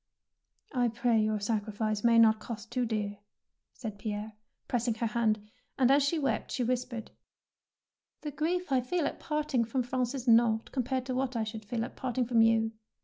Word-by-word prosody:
"I 245 -2 +2
pray 235 -1 +2
your 215 0 +1
sacriflce 215 0 -1
may 235 -1 +5
not 220 -1 +6
cost 220 -1 -7
too 250 -2 0
dear," 205 -2 -2 0.6
said 215 -5 -6
Pierre, 210 0 -4 0.3
pressing 235 -2 0
her 230 - -2
hand; 215 -2 0 0.3
and 260 -1 +4
as 280 +1 +6
she 285 +4 +1
wept 285 -3 -1
she 250 - -1
whis 250 +1 0
pered, 235 -3 -7 0.4
— - - -62
" - - -61
The 300 - -3
grief 330 +3 -1
I 260 -1 +4
feel 320 +6 -1
at - - -3
parting 300 -6 0
from 245 +3 -1
Prance 250 +1 -1
is 255 -1 -5
naught 225 -1 +4
compared 255 0 -1
to 260 - -3
what 255 0 -1
I 225 - +1
should 220 0 -6
feel 225 +2 -2
at - - -10
parting 255 -1 -1
from 230 -1 +3
you." 225 0 +4
235 Hz, 200 wpm, -30 LUFS, 220-255 Hz, 0.6 s, not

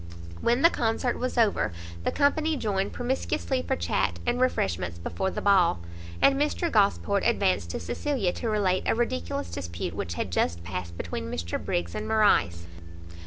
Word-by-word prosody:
When 240 +3 +2
the 335 - +7
Concert 235 +1 0
was 255 0 -2
over, 220 - +3 0.3
the - - +2
company 305 +2 +2
joined 200 -5 -1
promiscuously 245 - -1
for 85 - -1
chat 85 0 0
and 250 - 0
refreshments 90 - 0
before 190 - -2
the - - -5
ball; 185 - +4 0.4
and 275 +1 +5
Mr 315 +3 0
Gosport 200 -1 +2
advanced 190 - +1
to 85 - -3
Cecilia, 195 - -1
to 230 - -3
relate 195 -4 +1
a - - +3
ridiculous 85 - -2
dispute 85 -1 -4
which 85 +1 -4
had 90 - -3
just 85 0 0
passed 85 -1 -5
between 75 -3 -4
Mr 85 +2 -3
Briggs 85 -1 -2
and 105 0 -4
Morrice. 85 - +3
185 Hz, 165 wpm, -27 LUFS, -, 0.4 s, the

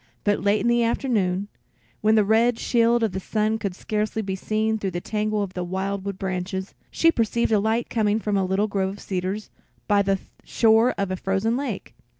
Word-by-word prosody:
But 205 -1 +1
late 205 +1 +2
in 230 - 0
the 240 0 +3
afternoon, 205 -6 0 0.5
when 215 +1 +4
the 215 -2 +4
red 225 +3 +3
shield 235 0 +2
of 220 - +1
the 190 - -3
sun 215 +3 0
could 195 -4 -3
scarcely 215 +2 -2
be 190 -1 -3
seen 220 +2 -1
through 195 - -2
the 175 -1 -3
tangle 215 +2 -1
of 190 -2 -6
the 180 - -3
wild 190 +2 -3
wood 200 -1 -4
branches, 190 0 -3 0.2
she 330 - +3
perceived 235 -3 0
a 215 - +4
light 220 +3 0
coming 215 -2 +1
from 210 -2 -1
a 195 - +2
little 190 +3 +1
grove 195 -2 -1
of 200 +1 -8
cedars 190 +2 -4 0.4
by 205 -1 +4
the 195 0 +1 0.3
shore 225 +2 +3
of 200 -1 -1
a - - 0
frozen 195 +5 0
lake. 255 -6 -4
210 Hz, 205 wpm, -24 LUFS, 195-220 Hz, 0.5 s, when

